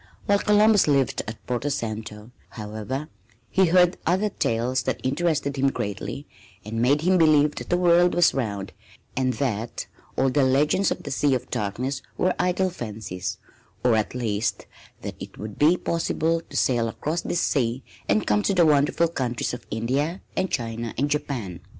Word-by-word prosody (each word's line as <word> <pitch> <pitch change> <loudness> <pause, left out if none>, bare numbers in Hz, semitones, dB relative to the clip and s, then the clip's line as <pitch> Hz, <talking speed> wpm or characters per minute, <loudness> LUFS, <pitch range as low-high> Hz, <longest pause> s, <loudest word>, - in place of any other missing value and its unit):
While 200 0 +3
Columbus 210 -2 +4
lived 140 -3 +2
at 110 0 -8
Porto 125 +3 -1
Santo, 110 -3 -5 0.2
however, 110 +7 -5 0.4
he 190 -1 +4
heard 180 +1 +4
other 190 +5 +1
tales 125 - 0
that - - -2
interested 140 0 0
him 135 +1 +3
greatly 105 -6 -4 0.4
and 115 +2 -3
made 140 +5 +3
him 180 +2 +3
believe 150 -2 +5
that - - -8
the 175 - +3
world 175 0 +4
was 175 -1 +5
round 100 -7 -3 0.4
and 130 -1 +1
that 115 -4 -2 0.3
all 135 0 +3
the 145 - +2
legends 150 +8 +3
of - - -3
the 140 - -6
Sea 135 0 +2
of 125 0 -5
Darkness 120 +7 -2 0.2
were 185 - +2
idle 180 +1 +1
fancies 105 - -5 0.5
or 125 -2 +4
at 110 +2 -1
least 110 -3 -1 0.4
that - - -4
it - - -9
would 105 -1 -8
be 160 +5 +5
possible 165 -1 0
to - - -4
sail 120 -3 +2
across 155 +8 -2
this 175 - -1
sea 125 -2 0 0.3
and 105 +2 +2
come 105 0 +2
to 195 - 0
the 175 -2 +5
wonderful 150 +2 +3
countries 125 -9 -2
of 125 - -8
India 135 - -1
and 190 0 0
China 115 -3 -3
and 145 +3 0
Japan. 125 - -3
135 Hz, 170 wpm, -25 LUFS, 115-165 Hz, 0.5 s, believe